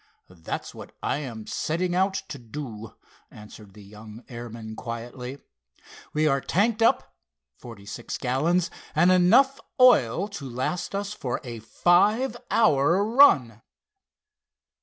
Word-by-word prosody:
"That's 85 -3 -6
what - - -12
I - - 0
am 120 -7 -7
setting 175 +3 -2
out 190 +2 +1
to 140 - -7
do," 115 -3 -8 0.3
answered 105 -1 -14
the 105 - -13
young 105 +3 -13
airman 115 -2 -8
quietly. 120 +3 -7 0.7
"We 155 +1 +1
are 135 -2 +1
tanked 215 +4 0
up 225 - +2 0.5
forty 115 -5 -12
six 100 - -6
gallons, 165 +8 0 0.2
and 175 +4 +5
enough 235 +10 +4 0.2
oil 195 - +5
to 150 -10 -7
last 175 +10 -3
us 200 +1 -3
for 125 -12 -4
a 120 -3 -7
five 205 - +2
hour 175 -2 +3
run." 145 - +4
140 Hz, 125 wpm, -25 LUFS, 115-185 Hz, 0.7 s, and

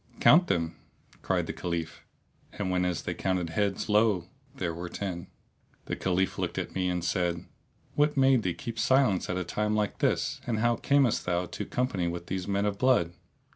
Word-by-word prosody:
"Count 175 +4 +6
them!" 85 -1 -1 0.4
cried - - 0
the - - -4
Caliph 85 -2 -4 0.5
and 95 -3 -2
whenas 90 -2 0
they - - -2
counted 90 -3 -1
heads, 100 +2 0
lo! 105 -4 +2 0.3
there 85 -10 -2
were 85 +1 -6
ten. 90 -2 -4 0.6
The - - -2
Caliph 95 0 0
looked - - -2
at - - -3
me 90 -1 0
and 90 -1 -1
said, 85 -1 0 0.5
"What 150 0 +2
made 135 -2 +5
thee 90 -4 -1
keep 115 +6 -6
silence 130 -8 +3
at 90 - -1
a 90 - -1
time 105 +5 -1
like 105 -1 -1
this - - 0
and 115 -3 0
how 120 +2 +2
camest 140 -8 +2
thou 90 0 +1
to - - -5
company 115 -9 -1
with 85 0 -4
these 95 0 -3
men 100 0 +1
of 100 -1 -1
blood? 120 -10 +3
95 Hz, 185 wpm, -28 LUFS, 85-110 Hz, 0.6 s, Count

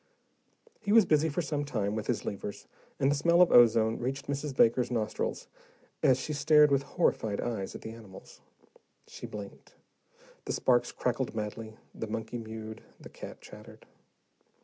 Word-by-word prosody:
He 205 -2 -3
was 220 -2 +7
busy 155 -1 +3
for 165 +4 -2
some 145 0 -2
time 105 -8 -2
with 110 -1 -4
his - - -1
levers, 100 0 -6 0.3
and 135 - +3
the - - +2
smell 170 +4 +3
of 180 - +6
ozone 115 -2 +5
reached 130 +3 -3
Mrs. 140 0 -4
Baker's 120 +2 +4
nostrils 115 -3 -2 0.5
as 130 -1 +4
she 150 - -4
stared 150 0 +5
with 140 -1 +3
horrified 110 -6 0
eyes 110 -5 -3
at - - -8
the 110 - -7
animals. 110 -5 -13 0.6
She - - -9
blinked. 100 -2 -10 0.7
The - - -2
sparks 120 -2 +2
crackled 125 -1 -2
madly, 110 +1 -5 0.2
the 110 - -5
monkey 115 +2 -4
mewed, 110 0 -8 0.2
the - - -12
cat - - -10
chattered. - - -13
120 Hz, 160 wpm, -30 LUFS, 110-145 Hz, 0.7 s, was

